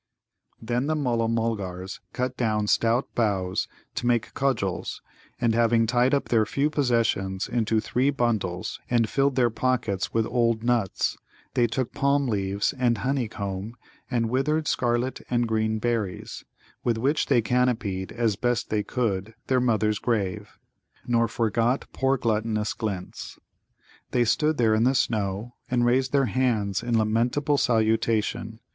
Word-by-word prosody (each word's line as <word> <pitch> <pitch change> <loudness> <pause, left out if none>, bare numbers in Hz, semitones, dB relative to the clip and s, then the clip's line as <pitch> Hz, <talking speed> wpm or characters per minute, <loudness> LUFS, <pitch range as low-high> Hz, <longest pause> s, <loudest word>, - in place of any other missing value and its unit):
Then 120 +4 -1
the 155 - +1
Mulla 120 -6 0
mulgars 100 -5 -2
cut 125 0 -2
down 110 -4 0
stout 115 +4 +1
boughs 95 -5 0 0.3
to 120 - -2
make 120 -2 +1
cudgels, 110 -10 -1 0.4
and, 115 -2 +2
having 115 0 +3
tied 125 +4 +3
up 140 - -2
their 115 -2 +4
few 140 +7 0
possessions 115 -9 0
into 115 -2 +1
three 125 +5 +1
bundles 110 -9 -1
and 120 -2 +2
filled 140 +2 +1
their 120 -3 +3
pockets 115 -5 -1
with 115 -1 +1
old 115 -2 +1
nuts, 120 -6 0 0.3
they 120 -1 +3
took 125 +2 -2
palm 140 0 +2
leaves 100 -1 0
and 120 -2 +2
honey 130 +1 -1
comb 100 +1 -5 0.3
and 115 -3 0
withered 150 +4 +1
scarlet 120 +1 0
and 120 -1 +1
green 110 0 0
berries, 110 -4 -3 0.4
with 115 -2 +1
which 140 +7 +1
they 120 -5 +3
canopied 115 -6 0
as 115 -3 0
best 120 +3 -1
they 105 -1 +2
could 110 -2 -2
their 130 -1 +2
mother's 110 -3 +1
grave, 100 -6 -2 0.5
nor 115 -1 +2
forgot 115 +3 0
poor 135 0 +1
gluttonous 110 -2 0
Glint's. 100 -6 -5 0.7
They 120 -1 +2
stood 155 +6 +2
there 115 -2 +3
in 110 +1 +3
the 130 +2 +3
snow, 105 0 -1 0.2
and 120 -1 +2
raised 130 +2 +2
their 140 -1 +3
hands 110 -4 0
in 120 -1 0
lamentable 120 +7 +1
salutation. 110 -1 +1
115 Hz, 145 wpm, -25 LUFS, 110-125 Hz, 0.7 s, their